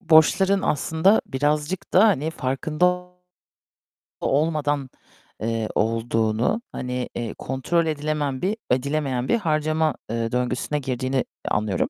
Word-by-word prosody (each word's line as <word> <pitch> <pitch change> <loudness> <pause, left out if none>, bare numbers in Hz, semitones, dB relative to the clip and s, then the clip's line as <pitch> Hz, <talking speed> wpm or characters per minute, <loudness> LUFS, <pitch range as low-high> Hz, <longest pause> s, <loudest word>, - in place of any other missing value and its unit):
borçların 190 +3 +4
aslında 160 +7 +3
birazcık 150 +6 -1
da, 195 +5 +7
hani, 160 -6 +1
farkında 175 +6 0 1.1
olmadan, 145 -2 +1 0.5
eee, 115 0 -1
olduğunu, 115 - +1
hani, 125 0 -3
eee, 120 -2 -3
kontrol 135 +6 0
edilemeyen 150 -3 -1
bir 200 +4 0
edilemeyen 130 -1 0
bir - - +3
harcama, 155 - +1
eee, 115 0 -2
döngüsüne 125 +4 -1
girdiğini 130 -1 -1 0.2
anlıyorum. 105 -3 0
145 Hz, 105 wpm, -24 LUFS, 125-160 Hz, 1.1 s, da